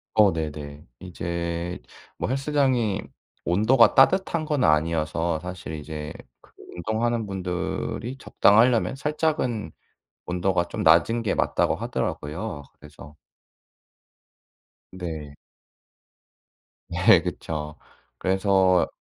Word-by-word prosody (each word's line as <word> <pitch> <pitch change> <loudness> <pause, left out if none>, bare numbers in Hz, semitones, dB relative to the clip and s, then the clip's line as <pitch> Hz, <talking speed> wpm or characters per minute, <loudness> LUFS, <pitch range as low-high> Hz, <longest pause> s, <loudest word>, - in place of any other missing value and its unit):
어. 105 -4 +5
네네. 75 -2 -6
이제 85 -1 -4 0.4
뭐 - - -2
헬스장이 130 -6 +1 0.4
온도가 110 +8 +4
따뜻한 170 +3 +4
건 150 -3 0
아니어서 80 +1 +1
사실 90 -2 -7
이제 75 0 -6 0.3
그 - - -23 0.2
운동하는 110 +5 -1
분들이 95 +6 -4
적당하려면 115 +1 +3
살짝은 140 - -1 0.5
온도가 90 0 0
좀 - - -5
낮은 85 +9 +4
게 110 - -1
맞다고 - - +1
하더라고요. 75 +1 -4 0.2
그래서 75 0 -14 1.8
네. 80 -5 -6 1.6
네. - - +5
그쵸. 75 -1 -5 0.4
그래서 95 -1 +3
90 Hz, 210 characters per minute, -25 LUFS, 80-115 Hz, 1.8 s, 어